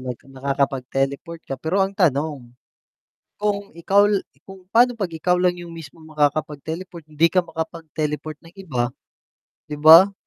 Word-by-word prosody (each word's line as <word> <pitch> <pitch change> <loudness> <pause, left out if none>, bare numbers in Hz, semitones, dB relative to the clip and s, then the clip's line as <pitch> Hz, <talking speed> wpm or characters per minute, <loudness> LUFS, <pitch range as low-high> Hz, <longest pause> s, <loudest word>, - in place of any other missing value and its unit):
mag 125 -2 -5
nakakapag-teleport 135 +3 -2
ka. 135 - -4
Pero 160 +5 -1
ang 195 - -4
tanong, 145 -7 0 0.9
kung 205 -1 -1
ikaw 195 +5 +3
l 205 -2 +2 0.2
kung 195 -1 -12
paano 245 +3 +5
'pag 200 -7 -3
ikaw 165 +2 0
lang 180 -1 +2
yung 175 -1 -9
mismong 160 0 -11
makakapag-teleport, 155 +4 -2
hindi 155 +2 +2
ka 185 - +4
makapag-teleport 160 -2 -5
ng 165 - -15
iba, 125 -8 -2 0.7
'di 150 -1 -7
ba? 165 +6 +9
160 Hz, 140 wpm, -22 LUFS, 145-180 Hz, 0.9 s, ba